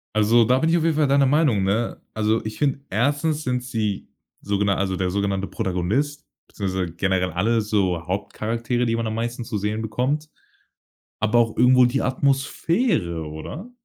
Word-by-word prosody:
Also, 110 +2 +5
da 125 +4 +3
bin 160 +4 +1
ich 170 - +4
auf 160 - 0
jeden 165 -2 +2
Fall 150 -2 +3
deiner 140 0 +4
Meinung, 140 -9 +3
ne? 110 +5 -1
Also, 110 +1 0
ich 110 0 -6
finde, 140 -2 0
erstens 145 - 0
sind 125 -1 -1
sie 110 -5 -3 0.3
so 100 0 -1
gena 100 -1 +2
also, 95 0 -1
der 90 0 -1
sogenannte 100 0 -1
Protagonist, 110 +10 -2 0.2
beziehungsweise 95 -3 -3
generell 95 -1 0
alle 110 +7 +1
so 95 -5 0
Hauptcharaktere, 115 +5 -2
die 115 - +1
man 115 - -2
am 110 - -2
meisten 120 +1 -3
zu 105 - -3
sehen 105 +2 -2
bekommt, 135 +8 -1 0.9
aber 110 +2 +2
auch 115 -2 +2
irgendwo 125 +1 +6
die 130 +3 0
Atmosphäre, 135 - 0
oder? 110 - -8
115 Hz, 175 wpm, -23 LUFS, 100-135 Hz, 0.9 s, irgendwo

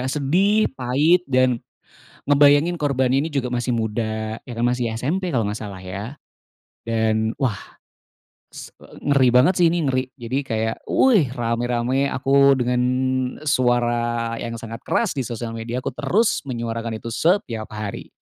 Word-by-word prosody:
sedih, 180 +10 +2
pahit, 140 +7 +2
dan 130 -2 +2 0.7
ngebayangin 145 +4 +5
korbannya 135 -3 +1
ini 160 - -4
juga 135 -3 -1
masih 125 0 -2
muda. 110 -1 -2
Ya - - -10
kan 115 +1 0
masih 120 -1 -1
SMP 175 +8 -1
kalau 115 -6 0
nggak 105 - -3
salah, 100 -3 -7
ya. 100 +9 -7 0.7
Dan, 110 -1 0
wah, 120 -7 +1 0.9
s - - -11
eee, - - -15 0.2
ngeri 130 -3 +4
banget 125 +8 +5
sih 170 - +6
ini, 165 -1 0
ngeri, 130 -1 0
jadi 125 +1 -3
kayak, 110 -4 -2
wuih, 210 - +4
rame-rame 120 +3 0
aku 140 +1 +4
dengan 125 0 0 0.6
suara 120 -3 +1
yang 115 0 -5
sangat 115 0 -8
keras 230 - 0
di 140 - -3
sosial 120 -2 -4
media 115 +2 -5
aku - - -2
terus 220 - +1
menyuarakan 115 -2 -3
itu 115 +1 -7
setiap 125 - 0
hari, 105 -1 -6
125 Hz, 150 wpm, -22 LUFS, 115-140 Hz, 0.9 s, sih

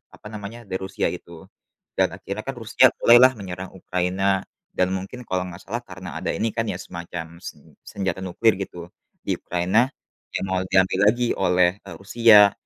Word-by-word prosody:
apa 105 - -12
namanya, 105 +3 -7
dari 95 - -2
Rusia 95 0 -2
itu. 85 -1 -10 0.5
Dan - - +4
akhirnya - - -6
kan - - -3
Rusia - - +4
mulailah 125 +2 +7
menyerang 95 -1 -7
Ukraina 90 +1 -2 0.5
dan 90 - +3
mungkin 100 +7 -6
kalau 95 -1 -1
enggak 90 0 -9
salah 120 +3 -3
karena 90 -4 -9
ada 95 - -3
ini 115 - -1
kan 115 - +1
ya, - - -4
semacam 85 -1 -7 0.2
sen - - -11
senjata 95 -1 -3
nuklir 105 +5 +2
gitu 90 -3 -6 0.4
di - - 0
Ukraina 95 +8 +2 0.5
yang - - -1
mau 95 - +1
diambil 95 0 +3
lagi 120 +2 0
oleh, 90 -2 +3
eee, 100 - -9
Rusia. 105 0 +6
95 Hz, 170 wpm, -23 LUFS, 90-105 Hz, 0.5 s, mulailah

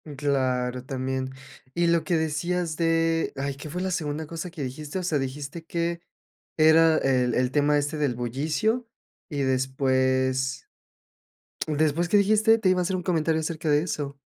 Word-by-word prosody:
Claro, 130 -3 0
también. 130 -1 -3 0.4
Y 170 0 +1
lo 170 -1 +3
que 175 - +1
decías 160 +1 -1
de, 165 -1 +1
ay, 140 0 -3
¿qué 145 +2 -8
fue 180 +4 -4
la 190 0 -1
segunda 155 -2 -2
cosa 165 +3 -6
que 165 -4 -6
dijiste? 145 +7 -5
O - - -4
sea, 160 -5 0
dijiste 145 +4 -5
que 170 0 -2 0.6
era 160 0 +6
el 125 -3 +2
el 125 0 +1
tema 145 +1 +3
este 145 +1 -1
del 140 -5 0
bullicio 155 - -1 0.4
y 145 -4 -2
después, 130 0 0 1.0
después, 155 +2 +1
¿qué 210 - +3
dijiste? 215 +2 +4
Te 200 - +1
iba 185 - +2
a - - +2
hacer 185 +1 -1
un 180 - -5
comentario 160 -2 +1
acerca 160 -1 -2
de 145 +1 +4
eso. 140 -4 -4
150 Hz, 170 wpm, -26 LUFS, 135-170 Hz, 1.0 s, era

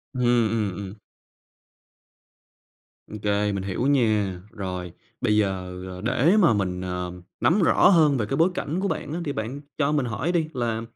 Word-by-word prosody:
Ừm, 125 - -2 0.3
ừm, 105 -4 -1
ừm. 100 +1 -7 2.1
Ô 110 - -6
kê, 105 0 +1
mình 100 -1 -3
hiểu 100 +7 -1
nha! 105 -9 +1
Rồi, 90 -4 -5 0.3
bây 105 0 +2
giờ, 90 -3 -1
ờ, 90 0 -8
để 130 - +3
mà 170 - +5
mình, 90 -3 -1
ờ, 90 -1 -4 0.3
nắm 190 +5 +3
rõ 170 - +5
hơn 155 -7 +5
về 110 - 0
cái 135 +5 -2
bối 165 +3 +4
cảnh 170 +1 -3
của 200 - 0
bạn 150 -4 -3
á 175 - -2
thì 145 - -1
bạn 120 +5 -4 0.2
cho 145 -1 +1
mình 145 -4 +1
hỏi 130 +9 -2
đi 165 -3 +1
là 115 -3 -1
110 Hz, 180 wpm, -24 LUFS, 95-145 Hz, 2.1 s, mà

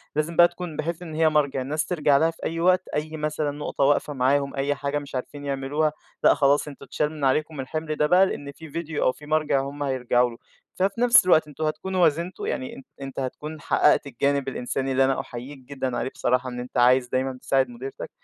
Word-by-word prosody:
لازم 155 +2 -1
بقى 175 - +8
تكون 175 -2 -7
بحيث 170 +2 -3
إن 160 -3 -7
هي 160 0 +4
مَرجِع، 145 -3 +1
الناس 150 +4 -2
تِرجَع 150 -5 +2
لها 165 +2 +3
في 165 - -17
أي 165 +1 -2
وقت، 185 +1 +3
أي 155 +1 -3
مثلًا 150 -1 -1
نقطة 145 -1 -3
واقفة 145 +1 +2
معاهم 140 +2 +1
أي 140 +1 0
حاجة 140 +1 -2
مش 140 -2 -9
عارفين 145 +3 -5
يعملوها، 140 +3 0 0.3
لإ - - +7
خلاص 145 +1 +3
أنتم 140 -1 -10
اتشال 150 +3 -1
من 150 -3 -3
عليكم 150 +2 0
الحمل 155 +3 -3
ده 150 0 +2
بقى 185 +3 +6
لأن 145 -6 -5
في 160 +3 -12
فيديو 160 0 -3
أو - - +4
في 150 - -14
مَرجِع 150 -2 +1
هُم 140 +2 -5
هيرجعوا 125 -2 +1
له، 115 - -11 0.4
ففي 195 +5 0
نفْس 245 -3 +6
الوقت 160 -4 +4
أنتم 150 +1 -6
هتكونوا 185 +4 -1
وازنتوا، 170 - 0
يعني 260 - -3
أن 265 - -11 0.2
أنت 135 0 -6
هتكون 150 +4 -5
حقّقت 150 -1 +3
الجانب 140 +2 0
الإنساني 135 +1 -2
اللي 135 0 +3
أنا 135 0 +1
أحييك 130 +4 -7
جدًا 130 -1 -4
عليه - - -2
بصراحة 125 0 0
إن 125 0 -6
أنت 125 +1 -6
عايز 125 +1 +5
دايمًا 130 +1 -1
تساعد 135 -2 +1
مديرتك، 130 +3 -7
145 Hz, 215 wpm, -25 LUFS, 135-155 Hz, 0.4 s, بقى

